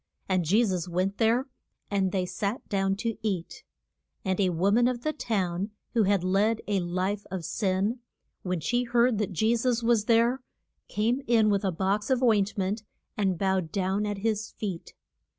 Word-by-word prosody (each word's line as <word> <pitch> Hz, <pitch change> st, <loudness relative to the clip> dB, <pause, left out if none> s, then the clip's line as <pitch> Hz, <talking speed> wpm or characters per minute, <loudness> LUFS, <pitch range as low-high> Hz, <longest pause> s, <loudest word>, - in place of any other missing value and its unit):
And 185 Hz, -2 st, +1 dB
Je 210 Hz, +9 st, +4 dB
sus 180 Hz, -4 st, -2 dB
went 185 Hz, +3 st, -1 dB
there, 235 Hz, +4 st, +2 dB, 0.4 s
and 195 Hz, -2 st, +1 dB
they 185 Hz, -1 st, 0 dB
sat 205 Hz, +6 st, -3 dB
down 195 Hz, -1 st, +1 dB
to 225 Hz, +1 st, -3 dB
eat. 195 Hz, -6 st, -3 dB, 0.6 s
And 190 Hz, 0 st, 0 dB
a 190 Hz, -2 st, +3 dB
wo 180 Hz, +3 st, +1 dB
man 240 Hz, +3 st, +4 dB
of 245 Hz, -1 st, -2 dB
the 310 Hz, -, 0 dB
town, 195 Hz, -, -1 dB, 0.2 s
who 225 Hz, -4 st, +3 dB
had 195 Hz, -2 st, +2 dB
led 205 Hz, +4 st, +2 dB
a 205 Hz, -2 st, +1 dB
life 185 Hz, +3 st, -2 dB
of 185 Hz, -4 st, -4 dB
sin, 200 Hz, -, 0 dB, 0.4 s
when 180 Hz, -3 st, -2 dB
she 240 Hz, +10 st, +1 dB
heard 240 Hz, -2 st, +2 dB
that 210 Hz, -2 st, -1 dB
Je 220 Hz, +7 st, +2 dB
sus 235 Hz, 0 st, 0 dB
was 230 Hz, -2 st, +3 dB
there, 235 Hz, +3 st, +3 dB, 0.5 s
came 230 Hz, +5 st, 0 dB
in 220 Hz, -3 st, +4 dB
with 200 Hz, 0 st, +1 dB
a 190 Hz, -, +1 dB
box 195 Hz, +5 st, -1 dB
of 260 Hz, -1 st, +2 dB
oint 210 Hz, -3 st, +3 dB
ment 200 Hz, +3 st, -1 dB, 0.3 s
and 190 Hz, -4 st, 0 dB
bowed 190 Hz, -3 st, 0 dB
down 195 Hz, +2 st, 0 dB
at 205 Hz, -1 st, -2 dB
his 215 Hz, +1 st, -1 dB
feet. 190 Hz, -6 st, -6 dB
205 Hz, 185 wpm, -27 LUFS, 190-230 Hz, 0.6 s, Je